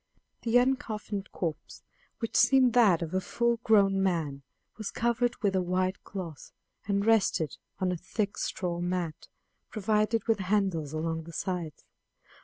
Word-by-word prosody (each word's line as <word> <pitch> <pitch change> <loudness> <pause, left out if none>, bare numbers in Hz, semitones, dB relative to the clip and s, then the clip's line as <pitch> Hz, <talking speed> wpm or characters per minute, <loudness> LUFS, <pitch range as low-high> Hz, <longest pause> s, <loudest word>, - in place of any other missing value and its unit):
The 235 +1 +3
uncoffined 220 -6 -1
corpse, 165 -4 -5 0.3
which 230 - -4
seemed 260 -3 +5
that 200 -9 +5
of 165 +1 -6
a 185 - +1
full 235 +4 0
grown 200 -4 +3
man, 160 -7 0 0.3
was 215 -2 -5
covered 240 +1 0
with 195 -2 +2
a 185 - +3
white 185 +1 -1
cloth, 175 -7 -7 0.4
and 200 0 +1
rested 205 - +2 0.2
on 185 -1 0
a 180 - -2
thick 205 +4 -3
straw 175 -2 -2
mat, 175 -3 -3 0.4
provided 215 +1 +1
with 225 -2 +2
handles 190 -6 0
along 160 +1 -2
the 170 - -10
sides. 175 -5 -4
195 Hz, 145 wpm, -29 LUFS, 175-220 Hz, 0.4 s, seemed